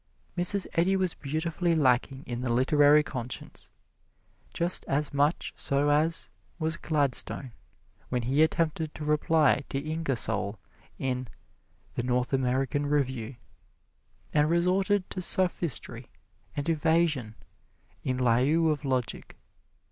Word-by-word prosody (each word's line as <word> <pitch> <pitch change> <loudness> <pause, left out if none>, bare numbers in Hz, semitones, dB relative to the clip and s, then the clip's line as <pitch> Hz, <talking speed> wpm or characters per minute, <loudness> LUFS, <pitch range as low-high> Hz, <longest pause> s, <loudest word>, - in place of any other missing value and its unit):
Mrs. 180 +2 +1
Eddy 180 +3 +2
was 185 -3 0
beautifully 165 +4 -1
lacking 135 -1 +1
in 120 0 -4
the 125 -2 -1
literary 145 +4 +5
conscience, 125 -4 -7 0.8
just 175 +1 +2
as 145 +1 -1
much 145 +3 +1
so 140 +1 0
as 155 +3 +1 0.3
was 160 -1 0
Gladstone 140 -4 +1 0.6
when 125 -2 -1
he 135 +6 +2
attempted 160 -1 0
to 150 - -6
reply 150 -1 +3
to - - -2
Ingersoll 140 -8 -1 0.4
in 130 -1 -2 0.7
"The - - -2
North 125 +1 -1
American 135 +2 0
Review," 130 -4 -1 1.0
and 150 0 +3
resorted 185 +3 +2
to 185 - -4
sophistry 175 -5 -1 0.5
and 145 - -2
evasion 155 -7 +1 0.7
in 130 -1 -1
lieu 130 +7 +3
of 150 -1 -3
logic. 130 -4 -2
145 Hz, 115 wpm, -28 LUFS, 130-165 Hz, 1.0 s, literary